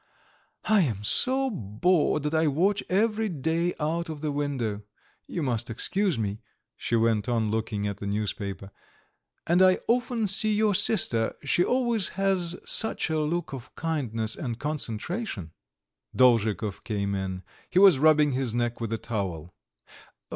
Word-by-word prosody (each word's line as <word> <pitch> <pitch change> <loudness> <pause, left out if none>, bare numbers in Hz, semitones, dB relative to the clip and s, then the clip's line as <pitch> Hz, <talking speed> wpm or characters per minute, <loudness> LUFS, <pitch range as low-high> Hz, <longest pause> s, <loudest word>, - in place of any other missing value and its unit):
"I 215 -2 +4
am 110 - -1
so 260 - +2
bored 150 - +1
that 150 +1 -2
I 160 0 +2
watch 185 +8 +1
you - - -16
every 215 +3 +1
day 165 +2 -1
out 165 +2 -2
of 155 -2 -6
the 155 -2 -1
window; 135 -8 -2 0.5
you 170 - -3
must 120 -3 -1
excuse 185 - 0
me," 105 -1 -3 0.4
she 115 - -2
went 115 -1 +1
on, 115 -3 0
looking 110 -2 -2
at 100 -1 -3
the 100 - -6
newspaper, 100 -1 -4 0.7
"and 175 +2 +3
I 185 0 +6
often 240 -1 +1
see 210 +2 +1
your 210 0 +2
sister; 115 - +2
she 145 +5 +2
always 235 -5 +1
has 190 -3 +1
such 220 -7 0
a 155 - +1
look 155 +1 -2
of 130 -2 -9
kindness 120 -9 -2
and 120 -5 -4
concentration." 145 - -4 0.6
Dolzhikov 110 -4 +2
came 100 -3 -2
in. 95 -1 -4 0.3
He - - -2
was 190 -7 +7
rubbing 150 -1 +4
his 130 -3 -1
neck 120 0 -1
with 115 -1 -3
a 115 - 0
towel. 90 -8 -4
145 Hz, 155 wpm, -26 LUFS, 110-180 Hz, 0.7 s, was